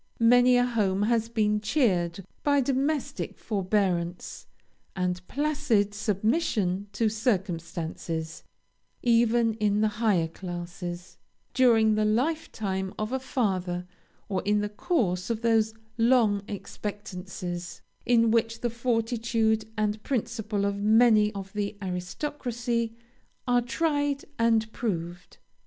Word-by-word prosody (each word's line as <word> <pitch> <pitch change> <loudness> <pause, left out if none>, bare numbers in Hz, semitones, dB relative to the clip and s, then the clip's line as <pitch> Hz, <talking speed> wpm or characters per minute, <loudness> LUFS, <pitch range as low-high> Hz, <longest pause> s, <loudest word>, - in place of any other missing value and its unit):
Many 245 +2 +6
a 245 - +4
home 205 -5 +1
has 225 0 +1
been 210 -2 +1
cheered 195 - +1 0.2
by 285 -1 +3
domestic 275 +2 -1
forbearance, 185 -4 -1 0.5
and 180 -1 -1
placid 285 -8 +1
submission 210 - 0
to 225 +2 +1
circumstances, 170 -7 -2 0.6
even 235 -1 +3
in 210 -1 +1
the 215 - +4
higher 190 -8 +3
classes, 175 0 -7 0.3
during 225 -4 +5
the 215 0 +1
life 255 +10 0
time 190 -2 -3
of 215 +3 -3
a 265 - 0
father, 185 -9 -1 0.4
or 195 -2 -1
in 210 +1 +1
the 210 - -2
course 205 - -1
of 230 -1 -1
those 220 -1 +2 0.2
long 230 -4 +4
expectancies, 185 -4 -6 0.2
in 230 -2 +4
which 230 0 +1
the 240 - -1
fortitude 230 -2 0
and 210 0 0
principle 220 -5 -2
of 200 0 -1
many 215 0 +5
of 195 -1 -7
the 205 0 -3
aristocracy 230 +4 -3 0.5
are 245 0 +4
tried 290 +2 0
and 225 -1 +2
proved. 175 -6 -4
215 Hz, 115 wpm, -27 LUFS, 190-235 Hz, 0.6 s, Many